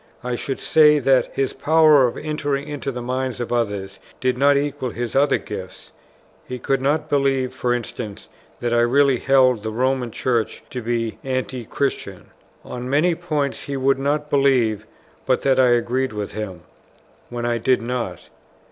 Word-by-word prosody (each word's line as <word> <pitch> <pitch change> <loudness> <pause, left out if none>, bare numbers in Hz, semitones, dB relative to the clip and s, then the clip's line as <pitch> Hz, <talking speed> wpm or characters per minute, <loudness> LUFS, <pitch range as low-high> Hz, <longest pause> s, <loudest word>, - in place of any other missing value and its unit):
I 125 0 -2
should 135 +2 -4
say 150 -1 +5
that 135 -2 +3
his 135 -1 -1
power 155 -2 +5
of 120 - -5
entering 145 -2 -2
into 145 -2 -4
the 125 -1 -6
minds 130 0 -2
of 120 0 -3
others 100 -4 -2 0.2
did 130 0 +1
not 140 +2 +4
equal 145 -2 -2
his 120 +2 -5
other 140 +1 +4
gifts; 95 -3 -9 0.5
he 125 - -6
could 135 +2 -1
not 145 +3 0
believe, 135 -2 +1
for 125 - -1
instance, 115 -3 -4 0.3
that 120 -1 -1
I 120 - +4
really 135 +1 +3
held 130 -4 +3
the 110 - -4
Roman 125 +2 0
Church 115 -1 -1
to 125 - -4
be 115 -1 -2
Anti 130 -2 -3
christian. 140 +5 -3 0.3
On 125 0 -6
many 155 +6 +3
points 155 -5 -3
he 140 -1 -3
would 135 0 +2
not 145 +2 -1
believe 125 -7 +2 0.4
but 130 -1 +1
that 135 -1 +3
I 130 - +6
agreed 120 +1 +1
with 105 -1 -4
him, 100 -5 -6 0.7
when 120 -1 -4
I 120 -1 0
did 125 +3 +2
not. 120 -7 -4
130 Hz, 170 wpm, -21 LUFS, 120-140 Hz, 0.7 s, I